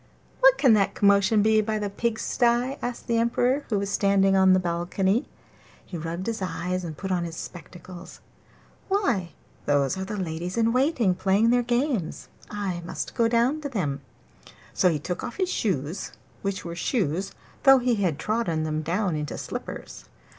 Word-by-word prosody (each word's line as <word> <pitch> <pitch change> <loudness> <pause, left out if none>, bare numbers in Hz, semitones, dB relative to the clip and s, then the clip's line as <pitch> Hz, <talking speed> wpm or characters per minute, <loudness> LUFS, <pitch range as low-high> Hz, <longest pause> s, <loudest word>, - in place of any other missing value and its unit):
'What - - +6
can 260 -6 +5
that 200 -2 +2
commotion 200 +1 +4
be 220 0 +4
by 215 0 -2
the 210 -1 -2
pigsties?' 235 +4 0
asked 245 0 -4
the 230 -1 +1
Emperor, 245 +4 +1
who 215 - +1
was 200 0 -2
standing 195 -1 +3
on 190 -1 +5
the 185 - +4
balcony. 185 +5 0 0.6
He 180 - -9
rubbed 170 +3 -4
his 230 -2 -3
eyes 180 0 -2
and 160 -3 -6
put 190 -1 -4
on 180 -2 0
his 165 -1 -5
spectacles. 180 +1 -10 0.7
'Why 240 - 0 0.3
those 145 +3 +2
are - - -2
the 210 +2 -5
ladies 175 +1 -4
in 230 0 +2
waiting 255 - +2
playing 195 +5 +2
their 245 0 +4
games; 240 - -1 0.2
I 195 -4 -3
must 170 - -5
go 230 - +2
down 240 +6 +1
to 285 - -4
them.' 150 - -2 0.7
So 180 - +3
he 160 - 0
took 175 +4 -5
off 240 - -5
his 375 -2 0
shoes, 180 - -2 0.3
which 195 -2 -3
were 170 - -5
shoes 190 - -1 0.3
though 270 -1 +7
he 250 -1 +1
had 180 -8 0
trodden 170 -4 -1
them 155 0 -2
down 180 +2 -1
into 150 -1 -4
slippers. - - -7
195 Hz, 175 wpm, -25 LUFS, 175-235 Hz, 0.7 s, though